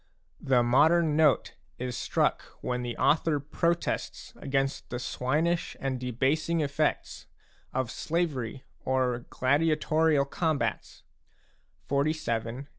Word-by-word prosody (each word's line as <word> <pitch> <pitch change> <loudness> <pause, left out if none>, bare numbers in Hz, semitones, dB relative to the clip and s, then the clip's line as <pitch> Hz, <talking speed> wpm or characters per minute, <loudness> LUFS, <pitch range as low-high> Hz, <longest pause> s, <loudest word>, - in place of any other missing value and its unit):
The 125 -2 +3
modern 155 +6 +4
note 155 -3 +3 0.2
is 125 -1 -4
struck - - 0 0.2
when 125 0 -2
the 120 -1 -4
author 155 -1 +2
protests 170 +4 -2
against 135 0 -2
the 120 - -3
swinish 150 +8 -1
and 135 -2 -2
debasing 135 +7 0
effects 150 +1 -1 0.4
of 130 -2 -2
slavery 140 -8 -2 0.2
or 125 -2 0
gladiatorial 155 +1 +2
com 160 +2 0
bats - - -4 0.8
(XLVII. 140 -4 -1
140 Hz, 105 wpm, -28 LUFS, 125-155 Hz, 0.8 s, modern